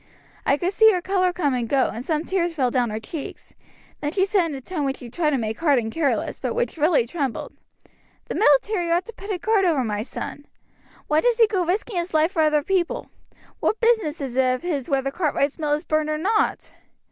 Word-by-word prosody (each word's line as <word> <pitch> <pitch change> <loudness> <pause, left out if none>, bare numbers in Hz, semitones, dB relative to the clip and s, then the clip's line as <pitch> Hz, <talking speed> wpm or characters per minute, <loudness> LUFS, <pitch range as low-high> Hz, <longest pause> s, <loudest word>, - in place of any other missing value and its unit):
I 280 - +4
could 355 +4 -1
see 440 +1 +6
her 365 - 0
color 370 0 +1
come 305 -6 0
and 240 -3 -2
go, 275 -2 +2
and 235 - -6
some 310 +2 -1
tears 345 -3 -1
fell 255 -5 +1
down 245 -2 +1
her 215 +1 -3
cheeks; 285 +6 -8 0.5
then 295 - -2
she 380 +2 +2
said 385 -3 +2
in 300 - -5
a - - -5
tone 310 +3 -4
which 270 -1 -1
she 240 -2 -10
tried 315 +2 +1
to 285 - +1
make 220 -2 -3
hard 295 -5 +3
and 225 -2 -1
careless, 300 -1 -1
but - - -3
which 485 0 -1
really 310 -5 +3
trembled, 270 -1 -4 0.7
'The - - -5
military 350 +2 +3
ought 345 +2 +2
to 465 - -9
put 400 0 -11
a 380 - -1
guard 420 +2 +2
over 320 -8 +2
my 210 -2 -2
son. 285 +4 -7 0.6
Why 305 +1 +2
does 485 -2 +2
he 460 - +7
go 400 -4 0
risking 375 +4 -2
his 345 -1 -2
life 315 +3 +3
for 330 - +1
other 305 -1 +3
people? 380 +7 -1 0.5
What 435 - 0
business 440 -11 +1
is 260 -3 -4
it 255 -1 +3
of 255 - -9
his 300 -7 -2
whether 275 -1 0
Cartwright's 290 -2 -1
mill 300 -2 0
is 300 - -1
burned 310 -1 0
or 305 - 0
not?' 425 +7 0
315 Hz, 230 wpm, -23 LUFS, 275-370 Hz, 0.7 s, he